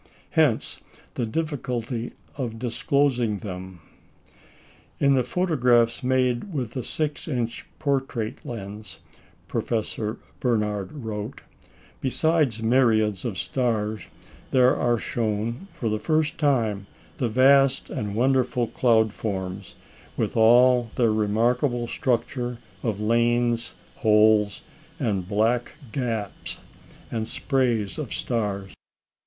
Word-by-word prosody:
Hence -, -, +2 dB, 0.3 s
the 120 Hz, -, -2 dB
difficulty 125 Hz, -4 st, -3 dB, 0.2 s
of 120 Hz, -5 st, -4 dB
disclosing 120 Hz, -1 st, +1 dB
them. 95 Hz, -3 st, -7 dB, 1.2 s
"In 140 Hz, 0 st, +4 dB
the 130 Hz, -2 st, +3 dB
photographs 125 Hz, -10 st, +2 dB
made 130 Hz, +5 st, +1 dB
with 130 Hz, -8 st, -3 dB
the 130 Hz, -, -3 dB
6 150 Hz, +4 st, -3 dB
inch 120 Hz, -6 st, -3 dB
portrait 135 Hz, -6 st, -2 dB
lens," 105 Hz, -2 st, -7 dB, 0.5 s
Professor 110 Hz, -1 st, -2 dB, 0.2 s
Barnard 105 Hz, -5 st, 0 dB
wrote, 110 Hz, -2 st, -6 dB, 0.6 s
"besides 135 Hz, -4 st, +1 dB
myriads 110 Hz, -4 st, +3 dB
of 110 Hz, -6 st, -3 dB
stars, 110 Hz, -4 st, -1 dB, 0.4 s
there 130 Hz, -1 st, +5 dB
are 120 Hz, -1 st, +2 dB
shown, 115 Hz, -, -2 dB
for 115 Hz, -, -3 dB
the 110 Hz, 0 st, 0 dB
first 155 Hz, +3 st, 0 dB
time, 115 Hz, -9 st, +1 dB, 0.3 s
the 120 Hz, -, 0 dB
vast 135 Hz, +3 st, +4 dB
and 105 Hz, -1 st, -3 dB
wonderful 125 Hz, 0 st, +2 dB
cloud 110 Hz, -2 st, +2 dB
forms, 95 Hz, -3 st, -4 dB, 0.4 s
with -, -, -1 dB
all 120 Hz, +1 st, +5 dB
their 115 Hz, -3 st, +3 dB
remarkable 120 Hz, +4 st, +1 dB
structure 125 Hz, 0 st, -1 dB, 0.2 s
of 110 Hz, -4 st, -2 dB
lanes, 120 Hz, +1 st, +1 dB, 0.2 s
holes, 105 Hz, -1 st, +4 dB, 0.4 s
and 95 Hz, -5 st, -1 dB
black 115 Hz, +4 st, +1 dB, 0.2 s
gaps, 115 Hz, -6 st, -3 dB, 0.5 s
and 110 Hz, -1 st, -2 dB
sprays 120 Hz, -8 st, 0 dB
of 145 Hz, -6 st, -5 dB
stars. 100 Hz, -5 st, -2 dB
120 Hz, 105 wpm, -25 LUFS, 110-130 Hz, 1.2 s, there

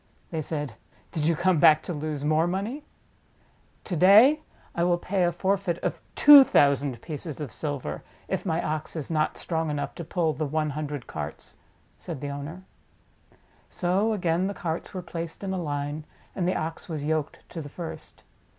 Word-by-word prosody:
They 160 Hz, -2 st, -2 dB
said: 145 Hz, -4 st, -3 dB, 0.4 s
"Did 155 Hz, -1 st, -1 dB
you 170 Hz, -, +3 dB
come 175 Hz, 0 st, +2 dB
back 155 Hz, -1 st, +6 dB
to 175 Hz, -, -4 dB
lose 150 Hz, -1 st, -3 dB
more 155 Hz, +2 st, +3 dB
money 205 Hz, +11 st, -3 dB, 0.5 s
?" -, -, -36 dB
"To 180 Hz, -, -3 dB
day 215 Hz, -, +7 dB, 0.3 s
I 170 Hz, -, 0 dB
will 175 Hz, 0 st, +3 dB
pay 185 Hz, +1 st, 0 dB
a 175 Hz, -, +2 dB
forfeit 190 Hz, 0 st, 0 dB
of -, -, -2 dB
two 290 Hz, -2 st, +10 dB
thousand 140 Hz, -, +3 dB
pieces 155 Hz, -1 st, -6 dB
of 145 Hz, -6 st, -5 dB
silver 140 Hz, -, -4 dB, 0.3 s
if -, -, -2 dB
my 165 Hz, -2 st, -1 dB
Ox 155 Hz, +1 st, -3 dB
is 160 Hz, 0 st, -5 dB
not 155 Hz, -1 st, 0 dB
strong 160 Hz, -2 st, -2 dB
enough 145 Hz, -1 st, -3 dB
to 170 Hz, -, -7 dB
pull 165 Hz, -1 st, 0 dB
the 155 Hz, 0 st, -2 dB
one 155 Hz, +1 st, 0 dB
hundred 145 Hz, -2 st, -4 dB
carts," -, -, -7 dB, 0.4 s
said 165 Hz, -6 st, -6 dB
the 145 Hz, -, -4 dB
owner. 145 Hz, +6 st, -6 dB, 1.1 s
So 195 Hz, +5 st, +1 dB
again 180 Hz, -2 st, +1 dB
the 200 Hz, -, -4 dB
carts 165 Hz, -2 st, -4 dB
were 185 Hz, -2 st, -5 dB
placed 165 Hz, +1 st, -6 dB
in 190 Hz, -1 st, -2 dB
a 185 Hz, -, -2 dB
line, 145 Hz, 0 st, -3 dB, 0.3 s
and 180 Hz, -2 st, 0 dB
the 185 Hz, -, +1 dB
Ox 160 Hz, +3 st, -4 dB
was 150 Hz, -3 st, -3 dB
yoked 155 Hz, -1 st, -2 dB
to 165 Hz, -, -6 dB
the 145 Hz, -, -8 dB
first. 165 Hz, +3 st, -8 dB
160 Hz, 185 wpm, -26 LUFS, 150-180 Hz, 1.1 s, two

